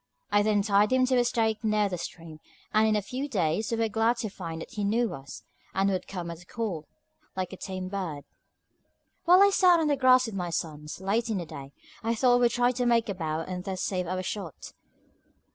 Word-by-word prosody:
I 205 Hz, -, +4 dB
then 205 Hz, -1 st, +2 dB
tied 205 Hz, +1 st, +3 dB
him 255 Hz, 0 st, +4 dB
to 255 Hz, 0 st, +2 dB
a 245 Hz, -, +4 dB
stake 225 Hz, -2 st, 0 dB
near 215 Hz, -1 st, +2 dB
the 180 Hz, -3 st, -4 dB
stream; 165 Hz, -2 st, -8 dB, 0.3 s
and 215 Hz, +1 st, +4 dB
in 215 Hz, -, +2 dB
a 210 Hz, -, 0 dB
few 265 Hz, +7 st, -4 dB
days 185 Hz, -, 0 dB
we 230 Hz, -, -1 dB
were 225 Hz, 0 st, +1 dB
glad 225 Hz, +2 st, +1 dB
to 230 Hz, -2 st, -3 dB
find 165 Hz, -4 st, -6 dB
that -, -, -9 dB
he 210 Hz, -4 st, -3 dB
knew 225 Hz, +3 st, +1 dB
us, 135 Hz, 0 st, -9 dB, 0.3 s
and 195 Hz, +1 st, +2 dB
would 185 Hz, -, -2 dB
come 175 Hz, -3 st, -5 dB
at 170 Hz, 0 st, -9 dB
a -, -, -16 dB
call, 195 Hz, -10 st, -4 dB, 0.5 s
like 185 Hz, 0 st, -3 dB
a -, -, -5 dB
tame 185 Hz, -1 st, -5 dB
bird. 180 Hz, -7 st, -4 dB, 1.0 s
While 360 Hz, +3 st, +7 dB
I 400 Hz, -, +5 dB
sat 360 Hz, -3 st, +5 dB
on 320 Hz, -, +1 dB
the 290 Hz, -, +3 dB
grass 255 Hz, -1 st, +5 dB
with 225 Hz, -, -6 dB
my 180 Hz, -3 st, -3 dB
sons, 150 Hz, -2 st, -4 dB
late 215 Hz, +5 st, 0 dB
in 215 Hz, -, 0 dB
the 175 Hz, -, -3 dB
day, 140 Hz, -3 st, -9 dB, 0.3 s
I 230 Hz, 0 st, 0 dB
thought 245 Hz, +2 st, +4 dB
I 245 Hz, -, +4 dB
would 240 Hz, -1 st, +4 dB
try 245 Hz, +1 st, +2 dB
to 250 Hz, 0 st, -2 dB
make 230 Hz, -2 st, +2 dB
a -, -, 0 dB
bow 160 Hz, -3 st, -3 dB
and 180 Hz, +2 st, -5 dB
thus 190 Hz, -1 st, -3 dB
save 180 Hz, -2 st, -1 dB
our 185 Hz, +1 st, -2 dB
shot. 185 Hz, -5 st, -6 dB
205 Hz, 235 wpm, -28 LUFS, 180-235 Hz, 1.0 s, While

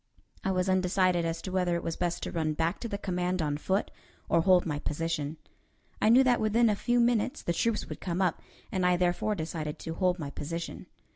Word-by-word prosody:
I -, -, 0 dB
was 185 Hz, 0 st, +1 dB
undecided 185 Hz, -2 st, +2 dB
as 165 Hz, 0 st, -3 dB
to 185 Hz, -, -5 dB
whether 180 Hz, -2 st, +1 dB
it 170 Hz, -, -3 dB
was 165 Hz, -, -2 dB
best 175 Hz, -1 st, -2 dB
to -, -, -3 dB
run 155 Hz, -2 st, 0 dB
back 165 Hz, +2 st, -1 dB
to 235 Hz, -, -4 dB
the 200 Hz, -, -3 dB
command 180 Hz, -1 st, -1 dB
on 150 Hz, -3 st, 0 dB
foot 190 Hz, +7 st, -1 dB, 0.4 s
or 170 Hz, -, +4 dB
hold 180 Hz, 0 st, +4 dB
my 150 Hz, -3 st, -2 dB
position. 150 Hz, 0 st, -2 dB, 0.6 s
I 215 Hz, -, +4 dB
knew 250 Hz, +4 st, +7 dB
that 250 Hz, -2 st, +3 dB
within 220 Hz, +1 st, +3 dB
a -, -, +1 dB
few 240 Hz, +4 st, +1 dB
minutes 235 Hz, 0 st, +1 dB
the 170 Hz, -, 0 dB
troops 225 Hz, +4 st, 0 dB
would -, -, -8 dB
come 180 Hz, -1 st, -2 dB
up, 185 Hz, -4 st, +1 dB, 0.3 s
and 185 Hz, -2 st, -1 dB
I 180 Hz, 0 st, +4 dB
therefore 180 Hz, +4 st, +1 dB
decided 160 Hz, -3 st, -4 dB
to 165 Hz, -, -5 dB
hold 180 Hz, +1 st, +1 dB
my 145 Hz, -5 st, -5 dB
position. 165 Hz, +4 st, -5 dB
180 Hz, 220 wpm, -29 LUFS, 165-195 Hz, 0.6 s, knew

